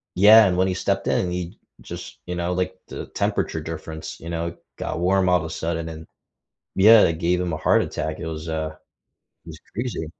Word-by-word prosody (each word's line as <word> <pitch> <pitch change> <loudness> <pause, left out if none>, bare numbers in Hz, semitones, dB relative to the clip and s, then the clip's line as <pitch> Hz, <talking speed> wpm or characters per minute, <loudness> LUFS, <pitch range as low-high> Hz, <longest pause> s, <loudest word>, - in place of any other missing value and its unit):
yeah, 105 +3 +8
and 90 -1 0
when 95 - +3
he 95 - 0
stepped 100 +1 -1
in, 90 - +1
he 90 -1 -5 0.2
just - - -9
you 90 - -4
know, 85 0 -1
like, 90 +1 -1
the - - -6
temperature 80 - -1
difference, 80 0 -7
you 85 - -8
know, 85 0 -3 0.2
got - - -3
warm 95 +1 +2
all 90 - +5
of - - -4
a - - -5
sudden 85 0 -3
and 80 0 -9 0.7
yeah, 110 +3 +8
it 80 -1 +1
gave 90 +1 +1
him 90 -3 -2
a - - -2
heart 80 - +3
attack, 80 +1 -4
it 85 - -5
was, 80 0 -6
uh 80 -1 -2 0.8
it - - -10
was 80 -1 -10 0.2
crazy. 120 -8 -3
85 Hz, 210 wpm, -23 LUFS, 80-95 Hz, 0.8 s, yeah